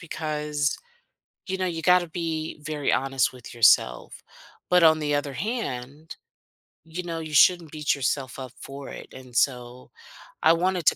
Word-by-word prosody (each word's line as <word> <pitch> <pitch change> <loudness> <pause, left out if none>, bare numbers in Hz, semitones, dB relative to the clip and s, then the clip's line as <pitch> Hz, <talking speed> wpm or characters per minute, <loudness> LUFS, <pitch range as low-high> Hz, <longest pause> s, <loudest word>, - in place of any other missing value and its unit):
because, 150 -3 -2 0.7
you 190 0 -2
know, 185 - -1
you 165 -2 -3
gotta 180 -1 +4
be 160 -2 -4
very 150 -2 -1
honest 135 -2 +1
with 125 -2 -11
yourself. 105 - +3 0.5
But 180 -1 +5
on 160 -1 +6
the 145 -1 0
other 145 -1 -2
hand, 150 - -5 0.7
you 170 +3 -6
know, 165 -1 -4
you 155 -1 -7
shouldn't 170 +1 +5
beat 150 -2 0
yourself 135 -1 -2
up 130 -2 -7
for 135 0 -8
it, - - -10
and 130 -2 -12
so, 125 0 -1 0.5
I 165 - +7
wanted 180 -1 0
to - - +6
150 Hz, 160 wpm, -25 LUFS, 135-165 Hz, 0.7 s, I